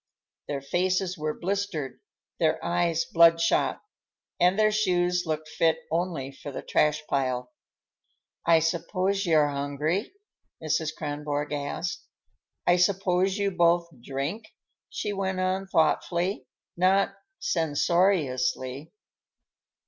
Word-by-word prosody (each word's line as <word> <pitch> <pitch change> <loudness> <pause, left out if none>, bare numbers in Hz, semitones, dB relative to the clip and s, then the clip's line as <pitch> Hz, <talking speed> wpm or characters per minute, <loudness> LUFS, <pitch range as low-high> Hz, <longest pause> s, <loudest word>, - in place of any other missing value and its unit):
Their 140 -1 -3
faces 185 +4 0
were 155 0 -3
blistered, 180 -8 -3 0.4
their - - +2
eyes 170 -1 +1
blood 165 0 +5
shot, 165 - +1 0.6
and 180 +2 +4
their 215 0 +4
shoes 180 -4 +1
looked 155 0 -2
fit 160 +1 +2
only 165 -5 -2
for 140 +1 -9
the - - -6
trash 150 0 +1
pile. 125 -2 -1 0.9
"I 165 -1 +5
suppose 185 +4 0
you're 155 -3 +4
hungry?" 145 - -2 0.5
Mrs. 155 0 -1
Kronborg 145 0 -3
asked. 145 +4 -3 0.6
"I 175 - +4
suppose 185 +1 +2
you 200 -1 0
both 170 -1 +3
drink?" 140 - -4 0.4
she 205 - -3
went 190 -1 -2
on 185 +1 -1
thoughtfully, 175 +3 +1 0.3
not 190 +2 +3 0.2
censoriously. 150 -4 0
170 Hz, 110 wpm, -27 LUFS, 150-185 Hz, 0.9 s, blood